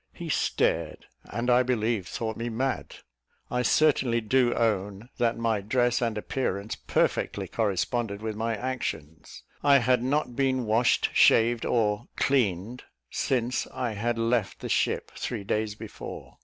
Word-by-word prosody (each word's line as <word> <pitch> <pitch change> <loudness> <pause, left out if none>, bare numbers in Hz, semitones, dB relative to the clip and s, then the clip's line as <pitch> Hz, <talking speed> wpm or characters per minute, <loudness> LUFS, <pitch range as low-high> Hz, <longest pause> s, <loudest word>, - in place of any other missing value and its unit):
He - - -7
stared, - - 0 0.2
and 120 +1 -4
I 125 0 +5
believe 115 -6 0
thought 110 -1 -3
me 115 +1 -3
mad. 130 +4 -2 0.6
I 125 - +1
certainly 130 -4 +3
do 120 +2 +2
own 105 0 -1
that 120 -1 +1
my 115 -3 0
dress 120 +4 +1
and 115 -3 -1
appearance 105 -3 -2
perfectly - - -1
corresponded 100 +1 -1
with 110 0 -4
my 115 0 -1
actions. 100 - -5 0.2
I 140 -1 +6
had 125 -1 +2
not 130 -1 0
been 130 -2 +1
washed, 115 +3 +2
shaved, 115 +1 +4
or 110 0 +1
"cleaned," 120 -3 0 0.3
since 125 -1 -1
I 125 -3 -2
had 115 +3 -1
left 115 -3 0
the - - -5
ship, - - 0
three - - -4
days 105 +1 -1
before. - - -9
115 Hz, 140 wpm, -27 LUFS, 105-125 Hz, 0.6 s, I